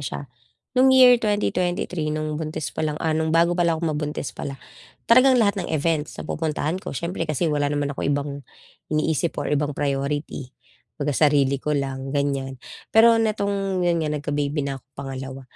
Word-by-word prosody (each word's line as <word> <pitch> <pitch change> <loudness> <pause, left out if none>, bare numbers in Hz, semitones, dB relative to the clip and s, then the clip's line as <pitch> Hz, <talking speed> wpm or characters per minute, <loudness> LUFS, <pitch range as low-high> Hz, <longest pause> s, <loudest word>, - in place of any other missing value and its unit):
siya. 140 +1 -5 0.5
Nung 260 +1 +5
year 250 -2 +7
2023 180 -5 -1
nung 155 0 -2
buntis 155 -1 -4
palang 150 -1 -2
ah, 160 +1 0
nung 160 0 0
bago 170 +2 +3
pala 170 -2 +2
akong 160 -1 -1
mabuntis 150 -1 -3
pala, 135 - -6 0.5
talagang 255 +2 +6
lahat 200 -4 +2
ng 175 - -5
events 155 0 -1
napupuntahan 160 +2 -2
ko 140 - -6
siyempre 170 0 -3
kasi 155 +3 0
wala 145 -1 +1
naman 145 -1 -1
akong - - -3
ibang 145 0 0 0.6
iniisip 155 +1 0
or - - -2
ibang 150 0 0
priority, 140 -1 -2 0.5
kumbaga 145 0 -1
sarili 140 -3 +3
ko 150 -1 -1
lang 135 -1 -3
ganiyan. 140 -2 -1 0.4
Pero 230 +1 +7
nitong 200 -3 0
yun 170 -1 +2
nga 155 - -1
nagka-baby 145 0 -2
na 135 -1 -4
ako - - -43
pangalawa, 135 -1 -6
155 Hz, 165 wpm, -23 LUFS, 145-175 Hz, 0.6 s, year